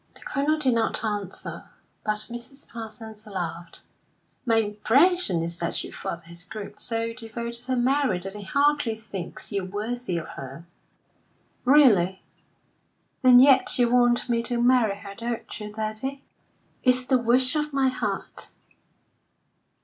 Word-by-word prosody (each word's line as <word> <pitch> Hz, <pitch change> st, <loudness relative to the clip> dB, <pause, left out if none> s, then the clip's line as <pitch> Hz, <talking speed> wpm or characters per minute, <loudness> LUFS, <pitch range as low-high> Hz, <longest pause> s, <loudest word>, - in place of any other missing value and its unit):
The -, -, -16 dB
Colonel 295 Hz, +2 st, 0 dB
did 265 Hz, -5 st, +2 dB
not 230 Hz, 0 st, 0 dB
answer, 205 Hz, -3 st, -5 dB, 0.3 s
but 215 Hz, 0 st, -1 dB
Mrs. 255 Hz, +4 st, -9 dB
Parsons 220 Hz, -1 st, -8 dB
laughed. 175 Hz, -3 st, -5 dB, 0.6 s
"My 225 Hz, -, +4 dB
impression 225 Hz, -, +2 dB
is 170 Hz, +1 st, -5 dB
that 170 Hz, -, -2 dB
your -, -, -9 dB
father 170 Hz, 0 st, -5 dB
has 170 Hz, +1 st, -8 dB
grown 205 Hz, +3 st, -8 dB
so 230 Hz, -1 st, -1 dB
devoted 235 Hz, +1 st, -5 dB
to 260 Hz, 0 st, 0 dB
Mary 255 Hz, -4 st, +2 dB
that 195 Hz, +2 st, -5 dB
he 210 Hz, -, -6 dB
hardly 280 Hz, +2 st, +1 dB
thinks 200 Hz, -5 st, -8 dB
you 200 Hz, -2 st, -1 dB
worthy 210 Hz, +1 st, -3 dB
of 165 Hz, -, -5 dB
her." 135 Hz, +5 st, -9 dB, 1.0 s
"Really? 215 Hz, -10 st, +5 dB, 1.0 s
And 250 Hz, -1 st, +8 dB
yet 265 Hz, 0 st, +5 dB
you 240 Hz, -1 st, +3 dB
want 240 Hz, 0 st, +3 dB
me 235 Hz, -1 st, +1 dB
to 240 Hz, 0 st, -2 dB
marry 240 Hz, -4 st, +4 dB
her, 200 Hz, 0 st, -9 dB
don't 235 Hz, +2 st, -5 dB
you, 210 Hz, 0 st, -6 dB
daddy?" 220 Hz, +6 st, -4 dB, 0.6 s
"It's 255 Hz, -1 st, +3 dB
the 260 Hz, -1 st, +3 dB
wish 250 Hz, +3 st, +5 dB
of 300 Hz, 0 st, -1 dB
my 270 Hz, -1 st, +2 dB
heart." 255 Hz, -, -4 dB
230 Hz, 140 wpm, -25 LUFS, 205-255 Hz, 1.0 s, And